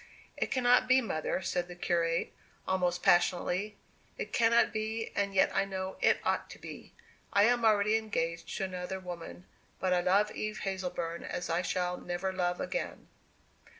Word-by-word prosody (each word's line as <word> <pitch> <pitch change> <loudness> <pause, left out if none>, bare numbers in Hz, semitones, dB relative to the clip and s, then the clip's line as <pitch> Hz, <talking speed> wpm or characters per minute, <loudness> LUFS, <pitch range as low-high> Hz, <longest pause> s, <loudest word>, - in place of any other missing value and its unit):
"It - - -1
cannot 250 -1 +4
be, 255 +1 +6
mother," 190 - -2
said 175 0 -1
the 175 - -9
curate, 170 -1 0 0.3
almost 180 -2 0
passionately. 185 +3 +2 0.4
"It - - -5
cannot 235 0 +4
be, 220 +1 -3
and 200 -1 0
yet 190 - +3
I - - +3
know 190 -1 -4
it - - +5
ought - - 0
to - - -10
be! - - -10 0.4
I 200 - +5
am 240 +1 +3
already 215 0 +4
engaged 170 -6 -2
to 195 - -2
another 185 0 -4
woman; 175 0 -8 0.3
but 185 -1 +1
I 180 - +3
love 200 +4 +3
Eve 215 0 -4
Hazleburn 180 -3 -3
as 175 -1 -4
I 170 +2 +2
shall 180 -1 -1
never 180 +2 -3
love 180 -1 0
again!" - - -4
190 Hz, 165 wpm, -31 LUFS, 175-215 Hz, 0.4 s, be